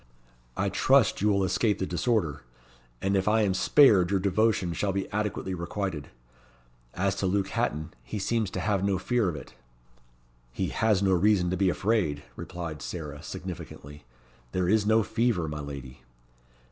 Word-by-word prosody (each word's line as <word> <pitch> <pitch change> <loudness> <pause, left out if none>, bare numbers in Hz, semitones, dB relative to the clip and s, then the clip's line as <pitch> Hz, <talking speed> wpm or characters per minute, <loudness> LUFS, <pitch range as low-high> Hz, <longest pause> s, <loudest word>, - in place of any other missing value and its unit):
I - - +1
trust - - +3
you 105 - +2
will 100 -1 +2
escape 95 +3 +1
the 95 - -2
disorder, 85 - 0 0.6
and 100 +1 +1
if 95 0 0
I 110 +1 +4
am 100 -2 +1
spared 100 -4 +5
your 100 -1 +2
devotion 100 -2 +1
shall 100 +5 -1
be 95 0 -2
adequately 105 -2 -2
requited. 85 -3 -4 0.9
As 95 +1 +1
to 95 - 0
Luke 95 +1 0
Hatton, 80 -11 -2
he - - -6
seems 110 +1 0
to - - -4
have 100 -3 0
no 100 -1 +1
fear 110 +1 +1
of 85 - -4
it." 75 - -10 1.0
"He - - -2
has 105 -3 +1
no 95 - +3
reason 90 -1 +3
to - - 0
be 95 0 +2
afraid," 90 -7 0
replied 85 -4 -6
Sarah, 75 -4 -6
significantly. 75 +1 -8 0.5
"This 90 0 +1
is 110 -2 +2
no 110 +1 +4
fever, 110 -5 0
my 75 -1 -5
lady." 70 -3 -8
95 Hz, 165 wpm, -27 LUFS, 85-105 Hz, 1.0 s, spared